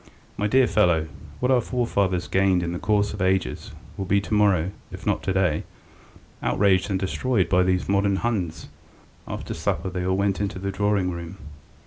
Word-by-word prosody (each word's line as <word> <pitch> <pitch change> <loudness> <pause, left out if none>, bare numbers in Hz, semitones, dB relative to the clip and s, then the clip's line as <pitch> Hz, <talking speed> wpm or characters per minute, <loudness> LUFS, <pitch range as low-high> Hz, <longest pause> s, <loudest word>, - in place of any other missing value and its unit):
My 105 - 0
dear 130 +4 +4
fellow, 85 -9 +2 0.3
what 125 +1 +1
our 125 -2 +4
forefathers 100 -7 0
gained 95 -2 +2
in 85 - -2
the 90 - -4
course 105 0 +1
of 100 - -6
ages 95 0 0 0.3
will 95 - -3
be 100 +2 +3
to 105 - -5
morrow, 95 -4 +3 0.2
if - - -9
not - - +1
to - - -1
day, 90 -5 +1 0.8
outraged 100 -1 +2
and 95 -1 0
destroyed 100 +2 0
by 90 0 +4
these 90 0 +1
modern 100 0 +2
Huns... 95 -7 -2 0.3
." - - -29
After - - -6
supper 95 - -2
they 90 0 -3
all 95 +1 +1
went 100 0 0
into 100 -2 -2
the 100 +1 -3
drawing 100 -2 +1
room. 85 +2 -7
95 Hz, 185 wpm, -24 LUFS, 90-105 Hz, 0.8 s, dear